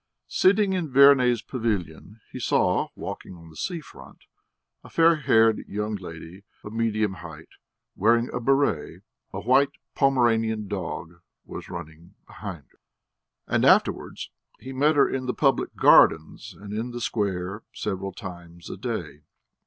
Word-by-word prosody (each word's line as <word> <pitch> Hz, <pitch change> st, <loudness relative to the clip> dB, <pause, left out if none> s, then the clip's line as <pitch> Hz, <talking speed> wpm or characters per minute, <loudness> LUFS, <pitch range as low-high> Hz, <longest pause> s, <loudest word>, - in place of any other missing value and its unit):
Sitting 200 Hz, +1 st, +3 dB
in 175 Hz, -5 st, -2 dB
Verney's 130 Hz, -3 st, +5 dB
pavilion, 105 Hz, -, -4 dB
he -, -, -7 dB
saw, -, -, +1 dB
walking 95 Hz, -, -7 dB
on 80 Hz, -1 st, -14 dB
the -, -, -17 dB
sea 170 Hz, -, -4 dB
front, -, -, -15 dB, 0.6 s
a -, -, -13 dB
fair 165 Hz, 0 st, +4 dB
haired 115 Hz, -6 st, +3 dB
young 105 Hz, +2 st, -3 dB
lady 90 Hz, -1 st, -9 dB, 0.2 s
of 105 Hz, -, -9 dB
medium 110 Hz, -3 st, 0 dB
height, 80 Hz, -2 st, -11 dB, 0.5 s
wearing 115 Hz, +3 st, +3 dB
a 125 Hz, -, -4 dB
béret; 135 Hz, -, 0 dB, 0.3 s
a -, -, -5 dB
white 135 Hz, +3 st, +4 dB, 0.2 s
Pomeranian 115 Hz, -6 st, +1 dB
dog 85 Hz, -3 st, -6 dB, 0.2 s
was -, -, -9 dB
running 85 Hz, +2 st, -10 dB
behind 95 Hz, -8 st, -8 dB
her. -, -, -32 dB, 0.7 s
And -, -, 0 dB
afterwards -, -, +2 dB, 0.3 s
he 130 Hz, -, -9 dB
met 150 Hz, +4 st, +2 dB
her 140 Hz, -, +5 dB
in 130 Hz, -1 st, -3 dB
the 125 Hz, -, -2 dB
public 135 Hz, -2 st, +1 dB
gardens 80 Hz, -1 st, +4 dB
and 100 Hz, 0 st, -8 dB
in 115 Hz, +3 st, -3 dB
the 120 Hz, 0 st, -6 dB
square 100 Hz, -3 st, -2 dB
several 95 Hz, -2 st, -4 dB
times 85 Hz, -3 st, -10 dB
a -, -, -7 dB
day. 75 Hz, +2 st, -5 dB
110 Hz, 145 wpm, -25 LUFS, 90-130 Hz, 0.7 s, Verney's